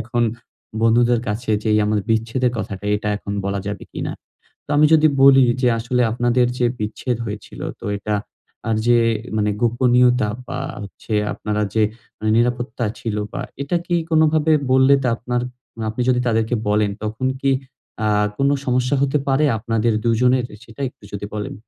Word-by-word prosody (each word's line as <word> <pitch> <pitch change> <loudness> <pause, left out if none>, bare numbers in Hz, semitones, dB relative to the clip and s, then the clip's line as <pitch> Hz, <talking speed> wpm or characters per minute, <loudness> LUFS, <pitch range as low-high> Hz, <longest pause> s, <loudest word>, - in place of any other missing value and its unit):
এখন 120 +2 -1 0.6
বন্ধুদের 120 +1 +4
কাছে 110 +2 -3
যেই 110 -1 +3
আমার 105 0 +1
বিচ্ছেদের 115 +3 +1
কথাটা 100 -2 -5
এটা 105 0 -4
এখন 100 - -6
বলা 100 0 -1
যাবে 100 0 -5
কিনা? - - -4 0.5
তো - - -13
আমি 150 +1 +6
যদি 155 0 +5 0.2
বলি 135 -1 +8 0.2
যে 125 - +4
আসলে 125 +2 0
আপনাদের 120 +1 +2
যে 120 - +3
বিচ্ছেদ 110 +3 -2
হয়েছিল 105 -1 -7 0.2
তো - - -11
এটা 105 +1 -3 0.5
আর 110 - +2
যে 120 0 +5 0.4
মানে 105 0 +1
গোপনীয়তা 125 0 +3 0.2
বা 130 - -5 0.2
হচ্ছে 100 +2 -9 0.2
আপনারা 105 0 -2
যে 110 - +3 0.4
মানে 110 0 -1
নিরাপত্তা 120 0 0
ছিল 110 -2 -3 0.2
বা 140 - -4 0.2
এটা 155 +5 -1
কি 175 - 0 0.2
কোনভাবে 155 0 +3 0.2
বললে 130 +1 +6
তা 125 - +1
আপনার 125 +1 -2 0.5
আপনি 120 +3 -2
যদি 125 -1 +3
তাদেরকে 115 +1 +1
বলেন 105 0 +2
তখন 110 +4 -2
কি 135 - +2 0.6
আ - - +3 0.3
কোন 140 - +3 0.2
সমস্যা 125 +2 +1
হতে 140 +2 +2
পারে 135 +3 +3
আপনাদের 115 +1 0
২ 115 -1 +3
জনের 125 0 +3 0.2
সেটা 115 +4 -15
একটু 110 - -19
যদি 100 0 -4
বলেন? 105 -1 -4
120 Hz, 165 wpm, -20 LUFS, 110-130 Hz, 0.6 s, বলি